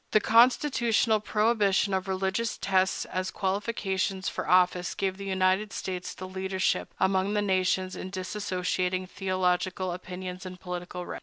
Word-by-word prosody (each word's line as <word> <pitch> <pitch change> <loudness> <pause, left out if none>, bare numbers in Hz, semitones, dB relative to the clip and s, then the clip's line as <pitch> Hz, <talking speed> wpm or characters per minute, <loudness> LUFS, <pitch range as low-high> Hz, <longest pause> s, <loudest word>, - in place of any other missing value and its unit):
The 215 - +7
constitutional 235 -1 +4
prohibition 210 -2 +2
of 190 0 -1
religious 190 +4 -1
tests 190 -1 +1
as 185 0 -3
qualifications 190 -1 -1
for - - -5
office 180 -1 +3
gave 190 -1 -1
the 200 - -7
United 190 +2 +1
States 180 -1 -5
the 185 - -7
leadership 190 0 -1
among 190 +2 +2
the 210 - +2
nations 185 -1 +1
in 185 - -6
dissociating 185 -1 -2
theological 185 -1 -1
opinions 180 +1 -6
and 185 -1 -8
political 180 0 -6
rights. - - -6
190 Hz, 140 wpm, -28 LUFS, 185-200 Hz, -, The